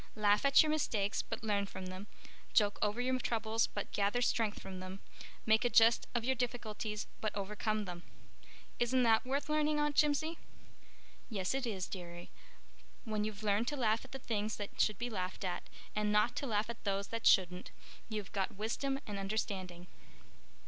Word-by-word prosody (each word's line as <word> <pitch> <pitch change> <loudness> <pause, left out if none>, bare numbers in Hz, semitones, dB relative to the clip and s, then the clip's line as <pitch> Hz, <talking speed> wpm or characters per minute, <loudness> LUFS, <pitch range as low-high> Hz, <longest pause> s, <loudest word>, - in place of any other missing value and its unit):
Laugh 210 -1 +3
at 275 +2 +7
your 310 - 0
mistakes 215 -10 0
but - - -6
learn 200 -2 +1
from 190 -1 -7
them, 185 +2 -7 0.5
joke 205 -3 +4
over 210 +2 +1
your 255 +1 +1
troubles 225 -2 +1
but 205 - -5
gather 205 +4 +1
strength 225 -3 +1
from 190 -1 -7
them, 185 +1 -7 0.5
make 220 +2 +4
a 245 - +3
jest 230 0 +5
of 235 -1 0
your 265 - +3
difficulties 225 -4 -3
but 215 - -1
overcome 210 +1 -1
them.' 175 -2 -6 0.8
Isn't 250 +1 +3
that 225 +1 +4
worth 275 +2 -1
learning, 300 0 +2
Aunt 295 -1 +1
Jimsie?" 305 +3 +2 0.9
"Yes, 195 -3 -1
it 265 -2 -1
is, 190 -5 -2
dearie. 175 -2 -8 0.7
When 215 -3 -1
you've 215 0 -4
learned 210 +3 +2
to 295 - -1
laugh 225 -3 +2
at 265 - -14
the 270 - -5
things 215 -4 -2
that 205 -1 -3
should 215 -2 +2
be 240 +2 -3
laughed 185 -2 -3
at, 180 - -3 0.3
and 210 0 +1
not 210 +3 +3
to 280 - -2
laugh 215 -2 +1
at 235 0 -7
those 200 -1 -1
that 230 0 0
shouldn't, 180 -1 +4 0.4
you've 210 -3 -4
got 195 +1 -1
wisdom 270 +6 -1
and 205 -2 -4
understanding." 195 -3 -3
215 Hz, 180 wpm, -34 LUFS, 200-240 Hz, 0.9 s, at